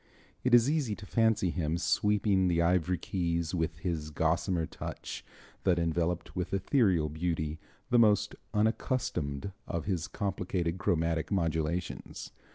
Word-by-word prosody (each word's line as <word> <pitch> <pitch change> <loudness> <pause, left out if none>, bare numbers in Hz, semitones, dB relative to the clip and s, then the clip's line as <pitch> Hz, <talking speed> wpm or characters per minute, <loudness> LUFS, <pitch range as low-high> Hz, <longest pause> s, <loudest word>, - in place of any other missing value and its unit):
It 125 -1 +5
is 120 +1 +6
easy 145 -8 0
to 100 +2 -10
fancy 110 -4 +2
him 80 -1 -1
sweeping 95 +3 +2
the 85 -1 +2
ivory 90 +1 +2
keys 85 -2 -1
with 80 -3 -1
his 80 -3 -3
gossamer 80 +2 +1
touch - - -7 0.4
that 90 -3 +3
enveloped 85 +1 -1
with 90 +1 -1
ethereal 95 - +2
beauty 80 0 -2 0.3
the 120 - +6
most 105 -3 +4 0.2
unaccustomed 105 - -1 0.2
of 85 -2 -3
his 90 -6 -1
complicated 90 -3 -2
chromatic 80 -3 0
modulations. 85 -1 -2
90 Hz, 130 wpm, -30 LUFS, 80-100 Hz, 0.4 s, is